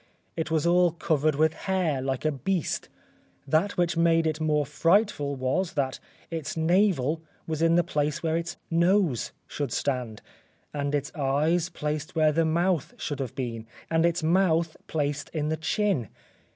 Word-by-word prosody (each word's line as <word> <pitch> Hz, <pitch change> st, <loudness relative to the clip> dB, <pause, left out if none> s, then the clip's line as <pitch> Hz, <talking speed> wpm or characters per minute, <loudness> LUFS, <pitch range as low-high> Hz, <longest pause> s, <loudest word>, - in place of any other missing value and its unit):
It 160 Hz, -2 st, -2 dB
was 160 Hz, -1 st, +1 dB
all 175 Hz, -1 st, +4 dB
covered 155 Hz, -3 st, +1 dB
with 155 Hz, +2 st, +3 dB
hair 180 Hz, -8 st, -1 dB
like 135 Hz, +1 st, -2 dB
a 155 Hz, -, +3 dB
beast. 165 Hz, +5 st, -2 dB, 0.6 s
That 160 Hz, +8 st, +1 dB
which 175 Hz, -1 st, +1 dB
made 165 Hz, 0 st, +3 dB
it 155 Hz, 0 st, -1 dB
more 150 Hz, -1 st, +2 dB
frightful 155 Hz, -, +2 dB
was, 135 Hz, +8 st, -1 dB
that 135 Hz, -3 st, -1 dB, 0.3 s
its 165 Hz, -1 st, -4 dB
navel 165 Hz, -3 st, +2 dB, 0.2 s
was 160 Hz, -1 st, -3 dB
in 165 Hz, 0 st, +4 dB
the 175 Hz, -, +4 dB
place 150 Hz, 0 st, -1 dB
where 160 Hz, -1 st, +1 dB
its 170 Hz, +1 st, -3 dB
nose 170 Hz, -, +2 dB
should 145 Hz, -4 st, -4 dB
stand, 125 Hz, -6 st, -2 dB, 0.5 s
and 145 Hz, 0 st, -1 dB
its 145 Hz, +1 st, -3 dB
eyes 155 Hz, +4 st, +1 dB
placed 150 Hz, -2 st, -4 dB
where 155 Hz, -1 st, +4 dB
the 165 Hz, +2 st, +2 dB
mouth 170 Hz, 0 st, 0 dB
should 145 Hz, -, -4 dB
have 130 Hz, -2 st, -4 dB
been, 115 Hz, -5 st, -4 dB, 0.2 s
and 165 Hz, 0 st, +3 dB
its 170 Hz, -1 st, +1 dB
mouth 170 Hz, -1 st, +2 dB
placed 145 Hz, -2 st, -2 dB
in 150 Hz, -1 st, 0 dB
the 160 Hz, -, 0 dB
chin. 160 Hz, -, 0 dB
160 Hz, 165 wpm, -27 LUFS, 145-170 Hz, 0.6 s, all